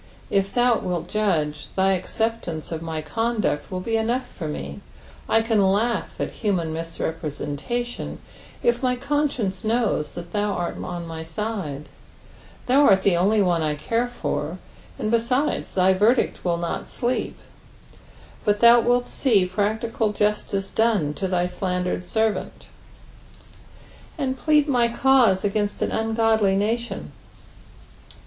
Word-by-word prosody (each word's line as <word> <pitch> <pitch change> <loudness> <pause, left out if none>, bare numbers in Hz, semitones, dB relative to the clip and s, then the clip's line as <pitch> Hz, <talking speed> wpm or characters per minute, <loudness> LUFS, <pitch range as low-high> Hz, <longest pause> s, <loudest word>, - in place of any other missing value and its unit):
It 195 0 +1
thou 245 -1 +4
wilt 180 -2 -3
judge, 155 -9 0
thy 190 0 +3
acceptance 190 -3 -2
of 165 -1 -3
my 160 -1 -4
conduct 220 -1 -1
will 185 -1 -4
be 225 +4 0
enough 240 +3 0
for 175 -9 -7
me; 70 - -5 0.5
I 225 - +4
can 225 -2 +2
laugh 210 +5 0
at - - -2
human 180 -7 -1
misrepresentation 165 +7 -4 0.5
if 240 0 +2
my 250 -1 +1
conscience 275 -7 -1
knons 220 -9 0
that 175 0 -8
thou 205 -1 0
art 175 -2 -3
on 175 -1 -5
my 165 -1 -6
side; 165 -5 -4 0.8
thou 265 +3 +4
art 190 -1 +5
the 190 - +4
only 200 +4 +3
one 175 -3 +2
I 155 -1 0
core 230 +10 -1
for; 175 -8 -3 0.4
and 215 - -2
besides, 250 +5 0
thy 190 0 +4
verdict 215 +7 +2
will 175 -2 +1
not 170 0 -3
sleep, 245 +1 -2 1.1
but 205 -1 +2
thou 235 +1 +7
nilt 245 +1 +2
see 215 -9 +2
practical 215 +3 -1
justice 210 -2 -1
done 210 -10 +2
to 190 +4 -3
thy 180 -1 +1
slandered 180 0 -2
servant. 220 -3 -1 1.5
"And 265 -3 -1
plead 300 +2 +3
my 245 -4 +3
eauta 235 -6 +4
against 205 0 0
an - - -1
vngodljf 225 0 +1
uni/on.'' 210 +4 0
205 Hz, 135 wpm, -23 LUFS, 175-235 Hz, 1.5 s, thou